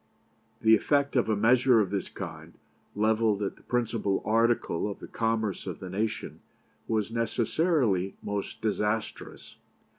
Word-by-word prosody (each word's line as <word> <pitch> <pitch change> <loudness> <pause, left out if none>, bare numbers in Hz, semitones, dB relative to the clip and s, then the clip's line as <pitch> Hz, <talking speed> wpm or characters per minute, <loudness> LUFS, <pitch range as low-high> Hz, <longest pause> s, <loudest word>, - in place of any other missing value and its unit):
"The 110 0 +6
effect 140 +5 +2
of 120 -3 +2
a 110 - +3
measure 120 +3 +4
of 100 -3 0
this 100 -1 -2
kind, - - -8 0.4
levelled 110 -1 +2
at 100 - -3
the - - -21
principal 115 -5 -1
article 115 -4 +1
of 100 - -6
the - - -10
commerce 110 -3 -1
of - - -5
the 95 -1 -7
nation, 110 +3 -3 0.5
was 110 -1 0
necessarily 115 - +1
most 100 -1 -4
disastrous. 105 0 -3
110 Hz, 140 wpm, -28 LUFS, 105-115 Hz, 0.5 s, The